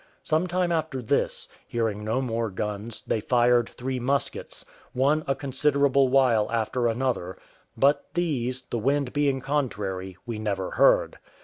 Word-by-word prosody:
Some 160 Hz, +3 st, +1 dB
time 180 Hz, 0 st, 0 dB
after 160 Hz, -5 st, -1 dB
this, 120 Hz, -, 0 dB, 0.2 s
hearing 110 Hz, -3 st, -2 dB
no 110 Hz, +5 st, 0 dB
more 115 Hz, -2 st, -1 dB
guns, 105 Hz, +3 st, -5 dB
they -, -, -1 dB
fired 120 Hz, +1 st, +3 dB
three 130 Hz, +1 st, -4 dB
muskets, 135 Hz, +3 st, -2 dB, 0.3 s
one 145 Hz, +5 st, +2 dB
a 135 Hz, -, +1 dB
considerable 140 Hz, 0 st, +2 dB
while 125 Hz, -5 st, +3 dB
after 115 Hz, +1 st, 0 dB
another; 115 Hz, -6 st, -1 dB, 0.4 s
but 140 Hz, +2 st, +3 dB
these, 130 Hz, -7 st, -1 dB
the 120 Hz, -, -4 dB
wind 140 Hz, +2 st, 0 dB
being 140 Hz, -2 st, +1 dB
contrary, 100 Hz, -10 st, -2 dB
we 115 Hz, -3 st, -4 dB
never 100 Hz, -3 st, -2 dB
heard. -, -, +3 dB
125 Hz, 140 wpm, -26 LUFS, 110-140 Hz, 0.4 s, fired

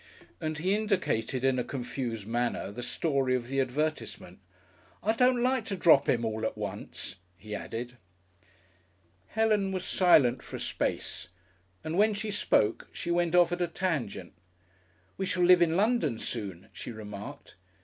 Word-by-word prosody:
And 155 Hz, 0 st, -3 dB
he 185 Hz, +5 st, +1 dB
indicated 185 Hz, -, 0 dB
in 130 Hz, -1 st, +3 dB
a -, -, 0 dB
confused 120 Hz, -4 st, -4 dB
manner 120 Hz, -3 st, -1 dB
the 120 Hz, +4 st, -7 dB
story 135 Hz, 0 st, 0 dB
of 120 Hz, -2 st, -3 dB
the 135 Hz, 0 st, 0 dB
advertisement. 150 Hz, +5 st, -3 dB, 0.6 s
"I 220 Hz, -, +3 dB
don't 250 Hz, +1 st, +3 dB
like 255 Hz, -1 st, +2 dB
to 200 Hz, -, -2 dB
drop 160 Hz, -6 st, +5 dB
'im 120 Hz, -1 st, +2 dB
all 110 Hz, 0 st, -2 dB
at 110 Hz, -, -2 dB
once," 95 Hz, -, -6 dB, 0.2 s
he 105 Hz, +3 st, -9 dB
added. 120 Hz, +4 st, -5 dB, 1.3 s
Helen 215 Hz, -3 st, +1 dB
was 185 Hz, -1 st, -3 dB
silent 140 Hz, -9 st, +4 dB
for -, -, -9 dB
a -, -, -5 dB
space, -, -, -2 dB, 0.6 s
and 160 Hz, +4 st, -2 dB
when 215 Hz, 0 st, +4 dB
she 215 Hz, +1 st, -3 dB
spoke 110 Hz, -, +1 dB
she 170 Hz, -, -4 dB
went 175 Hz, 0 st, +2 dB
off 175 Hz, -1 st, +5 dB
at 175 Hz, 0 st, -2 dB
a 175 Hz, -, +2 dB
tangent. 160 Hz, -, -3 dB, 0.8 s
"We 190 Hz, -, -2 dB
shall 180 Hz, -1 st, +1 dB
live 180 Hz, 0 st, +7 dB
in 170 Hz, 0 st, +3 dB
London 220 Hz, -, +2 dB
soon," 100 Hz, -7 st, -5 dB
she -, -, -7 dB
remarked. 105 Hz, -2 st, -9 dB
155 Hz, 160 wpm, -29 LUFS, 120-190 Hz, 1.3 s, live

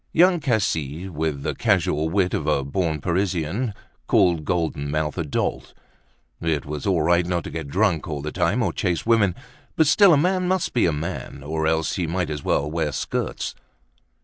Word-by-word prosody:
Young 180 Hz, +1 st, +5 dB
Cassis, 95 Hz, -, -1 dB
with 75 Hz, -3 st, -2 dB
the -, -, -1 dB
casual 75 Hz, +2 st, +1 dB
wit 90 Hz, 0 st, +1 dB
of 75 Hz, -, -2 dB
a 75 Hz, -2 st, +2 dB
born 80 Hz, +1 st, -1 dB
Parisian, 95 Hz, -, -1 dB, 0.4 s
called 85 Hz, -5 st, +3 dB
Golden 80 Hz, -5 st, -1 dB
Mouth 75 Hz, 0 st, -1 dB
a 85 Hz, -, -1 dB
dolt. 75 Hz, -, -3 dB, 0.7 s
It 80 Hz, -3 st, -1 dB
was 75 Hz, +3 st, -5 dB
all 90 Hz, -5 st, +2 dB
right 85 Hz, +2 st, +3 dB
not 85 Hz, 0 st, -1 dB
to -, -, -7 dB
get 80 Hz, -3 st, -5 dB
drunk 90 Hz, 0 st, +1 dB
all 75 Hz, -3 st, -4 dB
the 75 Hz, -, -3 dB
time -, -, +1 dB
or -, -, -1 dB
chase 85 Hz, -2 st, -1 dB
women, 110 Hz, -6 st, +3 dB, 0.4 s
but 160 Hz, -, +4 dB
still, 190 Hz, +6 st, +6 dB
a 155 Hz, -, +6 dB
man 180 Hz, +4 st, +1 dB
must 185 Hz, -1 st, 0 dB
be 120 Hz, -, +3 dB
a -, -, +2 dB
man, 75 Hz, -3 st, -5 dB
or 80 Hz, +1 st, -1 dB
else 80 Hz, 0 st, 0 dB
he 90 Hz, -3 st, -1 dB
might 85 Hz, 0 st, -1 dB
as 75 Hz, -2 st, -4 dB
well 70 Hz, -, +1 dB
wear 80 Hz, -2 st, -1 dB
skirts. -, -, -3 dB
85 Hz, 190 wpm, -23 LUFS, 75-95 Hz, 0.7 s, still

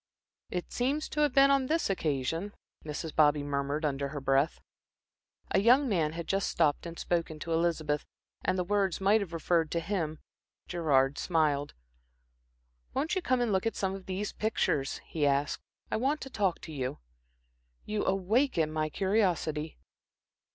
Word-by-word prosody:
"It 180 Hz, -1 st, -4 dB
seems 280 Hz, +5 st, 0 dB
to 300 Hz, -, -4 dB
have 295 Hz, -2 st, +4 dB
been 275 Hz, +1 st, +6 dB
on 275 Hz, -2 st, +3 dB
this 325 Hz, +3 st, +1 dB
occasion," 165 Hz, +2 st, -1 dB, 0.3 s
Mrs. 155 Hz, +1 st, -5 dB
Bobby 150 Hz, -1 st, +4 dB
murmured 145 Hz, +2 st, -1 dB
under 140 Hz, -1 st, -1 dB
her 145 Hz, +1 st, -5 dB
breath. 135 Hz, +3 st, +1 dB, 0.9 s
A -, -, +4 dB
young 250 Hz, +7 st, +5 dB
man 165 Hz, -8 st, +1 dB
had 170 Hz, 0 st, -5 dB
just 195 Hz, +3 st, 0 dB
stopped 155 Hz, 0 st, +1 dB
and 170 Hz, 0 st, -8 dB
spoken 165 Hz, -2 st, -1 dB
to 165 Hz, +2 st, -4 dB
Elizabeth, 160 Hz, -3 st, 0 dB, 0.4 s
and 185 Hz, -, +1 dB
the 180 Hz, -, +1 dB
words 195 Hz, -1 st, 0 dB
might 200 Hz, +3 st, +4 dB
have 190 Hz, -4 st, -5 dB
referred 165 Hz, -1 st, +1 dB
to 170 Hz, -, +1 dB
him. 165 Hz, -4 st, -2 dB, 0.5 s
Gerard 145 Hz, -5 st, +2 dB
smiled. 150 Hz, -4 st, +1 dB, 1.2 s
"Won't 295 Hz, +7 st, 0 dB
you 375 Hz, -, 0 dB
come 255 Hz, -6 st, +1 dB
and 240 Hz, -3 st, +1 dB
look 190 Hz, +2 st, +1 dB
at 225 Hz, -, -2 dB
some 190 Hz, -1 st, -1 dB
of 195 Hz, -1 st, -8 dB
these 195 Hz, +2 st, -3 dB
pictures?" 150 Hz, -10 st, 0 dB
he 150 Hz, -3 st, 0 dB
asked. 140 Hz, +1 st, 0 dB, 0.3 s
"I -, -, +1 dB
want 275 Hz, +6 st, +1 dB
to 270 Hz, -, -7 dB
talk 195 Hz, -6 st, 0 dB
to -, -, -9 dB
you." 130 Hz, -4 st, -3 dB, 0.9 s
"You 210 Hz, -1 st, -1 dB
awaken 195 Hz, -, +1 dB
my 155 Hz, 0 st, 0 dB
curiosity." 175 Hz, -5 st, 0 dB
170 Hz, 165 wpm, -30 LUFS, 150-205 Hz, 1.2 s, been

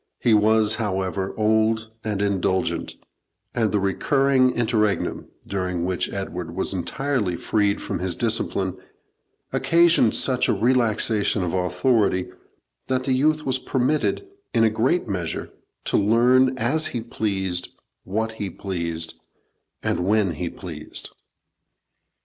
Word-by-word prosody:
He 115 Hz, -, +2 dB
was, 110 Hz, +1 st, +4 dB
however, 95 Hz, -3 st, -2 dB
old 110 Hz, +1 st, +1 dB
and 105 Hz, -2 st, -1 dB
indulgent, 95 Hz, -2 st, -1 dB, 0.6 s
and 115 Hz, -3 st, +1 dB
the 105 Hz, -, +1 dB
recurring 130 Hz, +7 st, +2 dB
interregnum, 110 Hz, -4 st, 0 dB, 0.2 s
during 90 Hz, -3 st, -2 dB
which 90 Hz, 0 st, -1 dB
Edward 90 Hz, -3 st, -5 dB
was -, -, 0 dB
entirely 105 Hz, +2 st, -1 dB
freed 100 Hz, +2 st, +1 dB
from -, -, -4 dB
his 90 Hz, -1 st, 0 dB
discipline, -, -, 0 dB, 0.8 s
occasioned 170 Hz, -8 st, +4 dB
such 130 Hz, -2 st, +2 dB
a -, -, +4 dB
relaxation 110 Hz, -3 st, +1 dB
of 85 Hz, -, -2 dB
authority, 95 Hz, +1 st, +1 dB, 0.6 s
that 130 Hz, -1 st, 0 dB
the 130 Hz, -, +1 dB
youth 155 Hz, +4 st, +2 dB
was 130 Hz, -1 st, +1 dB
permitted, 145 Hz, -, 0 dB, 0.3 s
in 115 Hz, -, +4 dB
a 110 Hz, -, +4 dB
great 130 Hz, +11 st, +1 dB
measure, 90 Hz, -5 st, -3 dB, 0.3 s
to -, -, +1 dB
learn 125 Hz, +5 st, +4 dB
as 140 Hz, +7 st, +2 dB
he 120 Hz, -, -4 dB
pleased, 95 Hz, -6 st, -2 dB, 0.3 s
what 110 Hz, +4 st, -2 dB
he 105 Hz, -3 st, -5 dB
pleased, 85 Hz, -3 st, -4 dB, 0.6 s
and -, -, 0 dB
when 100 Hz, +1 st, +2 dB
he 85 Hz, +2 st, -4 dB
pleased. 80 Hz, -5 st, -7 dB
110 Hz, 125 wpm, -23 LUFS, 95-125 Hz, 0.8 s, was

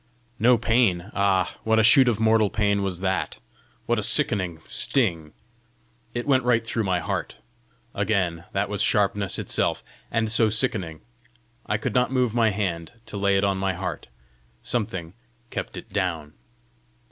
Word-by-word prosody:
No 120 Hz, +2 st, +5 dB
pain! 115 Hz, -6 st, +1 dB
ah, 95 Hz, -2 st, +1 dB
what 110 Hz, 0 st, +2 dB
a 110 Hz, -, +4 dB
shoot 125 Hz, +4 st, +6 dB
of 115 Hz, -3 st, +1 dB
mortal 110 Hz, -1 st, +3 dB
pain 100 Hz, -1 st, +1 dB
was 95 Hz, -2 st, -3 dB
that! 95 Hz, 0 st, -1 dB, 0.5 s
what -, -, +1 dB
a -, -, -1 dB
sickening 90 Hz, -5 st, +1 dB
sting! 85 Hz, -, 0 dB, 0.8 s
It 120 Hz, -, -2 dB
went 130 Hz, -3 st, +3 dB
right 115 Hz, -2 st, +2 dB
through 115 Hz, -1 st, -1 dB
my 95 Hz, -2 st, +1 dB
heart! 80 Hz, -, -4 dB, 0.6 s
Again! 95 Hz, -4 st, -1 dB
That 100 Hz, 0 st, -1 dB
was 105 Hz, -1 st, -2 dB
sharpness 100 Hz, -1 st, +1 dB
itself! -, -, -1 dB, 0.3 s
and 110 Hz, -1 st, 0 dB
so 115 Hz, -1 st, +4 dB
sickening! 105 Hz, -8 st, 0 dB, 0.7 s
I 105 Hz, -, 0 dB
could 110 Hz, -, -3 dB
not 125 Hz, 0 st, +2 dB
move 125 Hz, -4 st, +1 dB
my 115 Hz, -2 st, +3 dB
hand 95 Hz, -4 st, -3 dB
to 110 Hz, -, -9 dB
lay 100 Hz, 0 st, +2 dB
it 95 Hz, -, +1 dB
on 100 Hz, -1 st, +1 dB
my 95 Hz, 0 st, 0 dB
heart; 90 Hz, +1 st, -5 dB, 0.6 s
something 95 Hz, -8 st, -2 dB, 0.4 s
kept -, -, -5 dB
it -, -, -10 dB
down! 85 Hz, -6 st, -2 dB
100 Hz, 160 wpm, -24 LUFS, 95-115 Hz, 0.8 s, shoot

